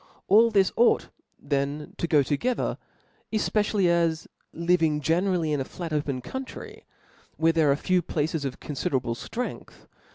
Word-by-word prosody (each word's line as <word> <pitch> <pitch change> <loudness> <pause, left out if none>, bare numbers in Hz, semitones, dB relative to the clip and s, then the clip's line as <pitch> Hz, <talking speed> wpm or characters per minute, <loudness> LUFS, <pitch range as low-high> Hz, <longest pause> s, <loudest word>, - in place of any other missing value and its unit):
Ali 225 +3 +7
this 195 -4 +3
ought 240 - +3 0.3
then 140 +1 -2
to 170 - 0
go 150 -3 +4
toge 150 - 0
ther, - - -3 0.5
efpecially 210 -2 +1
as 170 -2 +1 0.2
living 165 -3 +1
generally 165 +1 +1
in 145 - 0
a - - 0
flat 170 +4 -7
opea 145 -4 -2
country, 265 - -8 0.5
where 165 0 +3
there 160 -3 +3
are - - +3
few 180 +5 +1
places 155 -1 -2
of 135 -2 -4
confiderable 130 -4 -2
ftrength 235 - -6
165 Hz, 150 wpm, -26 LUFS, 145-185 Hz, 0.5 s, Ali